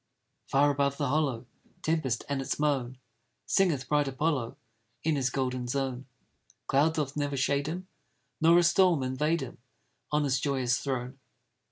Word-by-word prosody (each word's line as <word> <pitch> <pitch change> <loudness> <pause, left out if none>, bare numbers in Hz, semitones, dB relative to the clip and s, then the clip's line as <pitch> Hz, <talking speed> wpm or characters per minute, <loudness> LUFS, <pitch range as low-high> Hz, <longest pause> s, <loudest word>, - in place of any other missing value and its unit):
Far 145 +2 +4
above 140 0 0
the 145 -3 -1
hollow 135 -5 0 0.4
Tempest, 155 -8 0
and 140 -1 -1
its 135 - -2
moan, 135 -4 0 0.5
Singeth 160 -10 +2
bright 145 0 +2
Apollo 135 -3 -1 0.5
In 160 -1 +2
his 135 -2 +1
golden 125 -1 -2
zone, 130 0 -2 0.6
Cloud 150 +4 +2
doth 145 -3 -2
never 145 -1 -1
shade 140 +2 +1
him, 180 +4 -5 0.5
Nor 165 +2 +6
a 175 - +5
storm 170 -4 +4
invade 150 +5 0
him, 125 -2 -7 0.5
On 150 0 +2
his 130 -2 +1
joyous 130 -3 0
throne. 130 -1 -4
140 Hz, 150 wpm, -29 LUFS, 130-150 Hz, 0.6 s, Nor